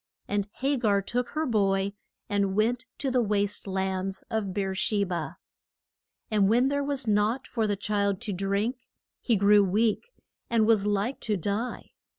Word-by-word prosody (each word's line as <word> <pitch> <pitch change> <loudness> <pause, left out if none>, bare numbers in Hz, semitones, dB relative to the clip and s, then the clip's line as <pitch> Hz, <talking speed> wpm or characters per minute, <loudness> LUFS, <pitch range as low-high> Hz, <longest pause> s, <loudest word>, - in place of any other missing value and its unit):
And 205 0 -1
Ha 275 +1 +2
gar 210 -5 +2
took 245 +4 -2
her 315 - +1
boy 195 -4 +1 0.3
and 200 -2 0
went 240 +4 +1
to 270 - -1
the 250 -1 +3
waste 205 -2 -1
lands 190 0 -2
of 215 -3 -1
Beer 195 0 -2
she 200 +1 +2
ba. 170 -3 -4 0.9
And 205 -2 +3
when 245 +4 +4
there 285 0 0
was 280 -2 -2
nought 215 +4 +1
for 225 -2 -1
the 205 - 0
child 200 -1 0
to 215 -4 -3
drink, 200 +6 -1 0.4
he 235 - +1
grew 205 +1 +5
weak, 215 - +1 0.4
and 230 -2 +3
was 215 -2 +3
like 205 +6 0
to 210 -2 -1
die. 205 +7 -3
205 Hz, 165 wpm, -27 LUFS, 195-235 Hz, 0.9 s, grew